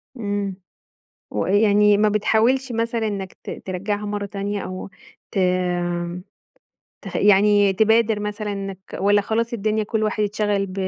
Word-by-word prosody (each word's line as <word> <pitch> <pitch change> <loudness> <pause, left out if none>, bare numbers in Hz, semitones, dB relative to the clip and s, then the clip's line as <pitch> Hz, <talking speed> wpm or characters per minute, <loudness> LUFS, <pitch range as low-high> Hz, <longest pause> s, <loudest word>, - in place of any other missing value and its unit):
امم، 205 -4 -3 0.8
ويعني 205 - +3
ما 215 +1 +3
بتحاولش 230 +5 +2
مثلًا 230 0 -1
إنك 195 -3 -4
ت - - -6
ترجّعها 205 +3 -4
مَرَّة 205 0 -3
تانية، 200 0 -3
أو 185 +1 -6 0.4
ت - - -3 1.6
تخ - - -5
يعني 205 0 +5
تبادر 220 +1 +3
مثلًا 210 0 -3
إنك 195 -1 -5 0.2
والّا 205 +1 +3
خلاص 230 +3 -1
الدنيا 215 -1 0
كل 220 +1 -2
واحد 215 0 0
اتشغل 205 -1 0
ب 185 - -9
205 Hz, 130 wpm, -22 LUFS, 200-220 Hz, 1.6 s, يعني